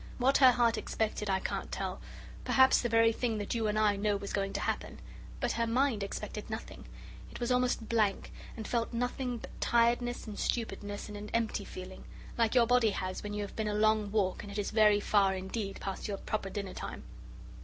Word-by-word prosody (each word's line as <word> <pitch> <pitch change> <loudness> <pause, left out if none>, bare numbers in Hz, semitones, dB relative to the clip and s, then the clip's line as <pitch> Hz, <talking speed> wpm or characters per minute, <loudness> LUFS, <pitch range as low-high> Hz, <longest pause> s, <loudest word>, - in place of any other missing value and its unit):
What 265 +2 +4
her 260 -2 +8
heart 235 -2 +2
expected 215 -1 -2
I 190 -1 +2
can't - - -4
tell - - -4 0.4
perhaps 260 0 +5
the 240 - -1
very 230 0 +5
thing 230 -1 -1
that 205 -1 -3
you 225 -2 0
and 210 0 0
I 210 -1 +3
know 205 0 +1
was 200 0 -6
going 195 -1 0
to - - -1
happen - - -3 0.4
but 245 -2 0
her 230 0 0
mind 245 -1 +1
expected 210 +2 -5
nothing; 220 +1 -7 0.5
it - - -9
was 240 0 -1
almost 250 -3 +1
blank, 215 -4 +1 0.3
and 220 - -5
felt 235 0 -1
nothing 245 +1 -2
but - - -9
tiredness 240 +1 +2
and 210 -2 -7
stupidness 205 -3 -2
and 210 - -8
an 210 +1 -7
empty 225 -3 0
feeling, 185 0 -9 0.3
like 230 0 +1
your 240 -2 +6
body 245 -1 +4
has 185 -2 -3
when 210 0 -5
you 210 - -2
have 200 - -8
been 220 -1 -1
a 210 - -1
long 215 -1 +3
walk 200 -3 0
and 205 -3 -9
it 200 - -6
is 205 - -2
very 215 -2 +5
far 195 -2 +3
indeed 195 +2 -4
past 195 +2 -4
your 200 -2 -3
proper 200 -1 -3
dinner 195 -1 -5
time. - - -6
215 Hz, 210 wpm, -31 LUFS, 205-235 Hz, 0.5 s, her